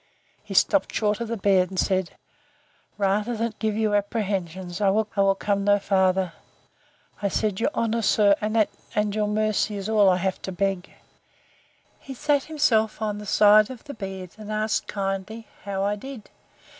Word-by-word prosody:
He - - -8
stopped - - +3
short 210 0 0
of 235 - -2
the 230 +1 -3
bed, 190 -2 +3
and 190 - -8
said, 190 -2 0 0.8
Rather 210 +4 0
than 230 0 -2
give 215 -2 -1
you 215 -1 +1
apprehensions, 190 -4 -2
I 200 - +4
will 200 -1 +2
come 200 0 -1
no 205 0 +4
farther. 190 -2 +1 0.9
I 200 - +1
said, 200 0 -1
Your 230 - +1
honour, 230 0 0
sir, 205 -2 +4
and 210 -1 -1
your 210 -1 0
mercy, 215 0 0
is 200 0 -5
all 210 -3 +4
I 180 - +3
have 190 +1 -2
to 190 - -5
beg. 195 0 -2 1.1
He 270 - -9
sat 285 +2 +1
himself 225 -8 +1
on 210 -1 -2
the 210 - -9
side 210 +1 +5
of 255 -3 -9
the 285 - -8
bed, 190 -4 -7
and 215 0 -7
asked 215 0 -1
kindly, 200 +3 -4 0.2
how 195 -1 -2
I 205 +1 0
did? 260 -1 -10
205 Hz, 170 wpm, -24 LUFS, 195-220 Hz, 1.1 s, side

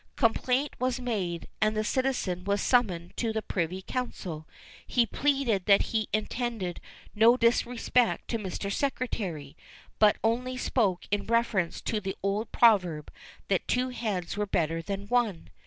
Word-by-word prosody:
Complaint 255 +3 +1
was 255 0 0
made, 195 -9 -3
and 215 0 +2
the 215 - +1
citizen 230 -8 -1
was 200 +1 0
summoned 185 -10 +1
to 230 -2 0
the 220 0 -2
Privy 185 +1 -2
Council. 180 -11 -5 0.4
He 240 -2 +3
pleaded 255 -6 0
that 200 -1 +6
he 220 -2 0
intended 215 -4 -2 0.3
no 225 +3 +5
disrespect 240 0 +2
to 230 - -1
Mr. 200 0 -4
Secretary, 185 - -3 0.4
but 210 -1 +5
only 250 +3 0
spoke 205 -8 0
in 205 0 0
reference 230 -7 +1
to 220 - -1
the 195 -1 -4
old 200 +3 -1
proverb, 180 -10 +3 0.3
that - - 0
"two 250 +1 +1
heads 210 -8 -3
were 205 0 -1
better 165 -3 0
than 200 +3 -5
one!" 225 -7 0
215 Hz, 145 wpm, -28 LUFS, 185-245 Hz, 0.4 s, that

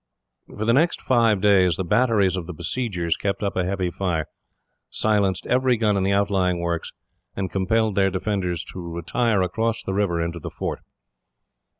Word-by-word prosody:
For 110 - -5
the 115 - +3
next 160 +6 +2
five 115 -6 +2
days, 95 -4 +4
the 95 - -2
batteries 105 -1 +2
of 90 -3 -5
the 90 - -7
besiegers 85 -2 -2
kept 100 +1 -3
up 100 - -1
a 90 - +1
heavy 90 -1 -1
fire, 85 -4 -1 0.6
silenced 100 -4 +1
every 125 -1 +2
gun 105 -2 +2
in 100 - +1
the 95 +1 +1
outlying 100 -3 +1
works, 85 -1 -3 0.4
and 95 -1 -3
compelled 110 +3 +1
their 95 -1 +3
defenders 95 -2 -2
to - - -7
retire 90 +5 0
across 115 +5 -1
the 95 - -3
river 95 -4 0
into 85 +1 -3
the - - -6
fort. - - -4
95 Hz, 175 wpm, -23 LUFS, 90-110 Hz, 0.6 s, days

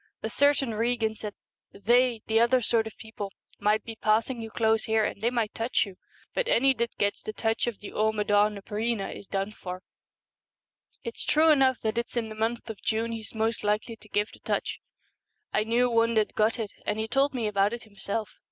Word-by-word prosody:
A 220 - -2
certain 280 -2 +3
Regan 225 0 0
said, 210 -1 -7 0.3
" - - -60
They, 240 +2 +3
the 225 0 +3
other 240 +2 +4
sort 225 0 +2
of 220 - -10
people, 210 -3 -7 0.3
might 210 +1 +2
be 225 - -7
passing 225 +3 +1
you 225 - -6
close 220 0 +2
here 220 -1 +2
and - - -4
they 230 - +3
might 230 -4 -1
touch 230 0 +1
you. 195 -2 -10 0.4
But - - 0
any 270 - +4
that 235 -1 -3
gets 205 0 0
the 215 - -5
touch 225 +2 0
of 235 -4 -4
the 205 - -7
Amaddn 210 -1 +2
na 200 - -8
Breena 215 0 -2
is 200 - -11
done 195 +1 -2
for." 185 -3 -7 1.2
It's 465 - -3
true 315 +2 +4
enough 265 -4 +4
that 220 +1 0
it's 235 +1 -4
in 225 -2 -1
the - - -6
month 225 +2 -2
of 225 -3 -7
June 225 +1 0
he's 225 -1 -6
most 225 +1 0
likely 210 +2 0
to 210 - -18
give 210 +1 0
the - - -14
touch. - - -2 0.7
I 215 - +3
knew 235 +3 +2
one 230 -1 +2
that 215 -1 +2
got 220 +3 +2
it, 220 -3 -3
and 210 - -1
he 220 0 -1
told 270 +4 +2
me 235 -3 -1
about 205 -1 +2
it 235 -1 -5
himself. 210 0 -5
220 Hz, 215 wpm, -28 LUFS, 210-235 Hz, 1.2 s, other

